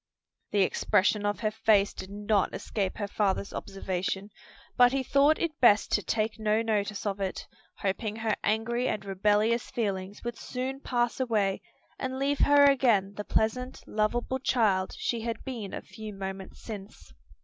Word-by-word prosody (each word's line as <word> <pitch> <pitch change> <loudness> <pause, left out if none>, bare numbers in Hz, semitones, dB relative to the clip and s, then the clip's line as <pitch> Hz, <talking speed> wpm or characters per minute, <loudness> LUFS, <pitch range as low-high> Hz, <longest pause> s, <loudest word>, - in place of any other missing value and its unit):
The 205 -2 +3
expression 205 +2 +2
of 205 - -2
her 215 -2 +1
face 210 -2 +3
did 190 - -8
not 205 0 0
escape 195 -3 -3
her 205 - -2
father's 200 -1 -1
observation, 195 +1 -3 0.4
but 245 0 +6
he 270 -1 +1
thought 280 +4 +4
it 320 -4 -2
best 210 -5 +5
to 210 - +3
take 220 +1 -1
no 215 +1 +2
notice 210 -2 -1
of 200 -1 -2
it, 190 -1 -3 0.3
hoping 205 +2 -2
her 220 -1 0
angry 235 +3 0
and 200 -1 -2
rebellious 210 +4 +1
feelings 200 -3 -3
would 240 0 -5
soon 260 +2 -4
pass 240 -3 -1
away 215 -6 +1 0.4
and 260 0 -3
leave 280 +1 0
her 285 0 +6
again 235 -8 +3
the 210 - -4
pleasant, 250 +5 -1
lovable 240 +4 -1
child 210 -8 +1
she 235 -2 -1
had 230 0 -4
been 230 -7 -5
a - - -6
few 215 -2 -9
moments 195 0 -7
since. 200 - -9
215 Hz, 160 wpm, -28 LUFS, 200-240 Hz, 0.4 s, but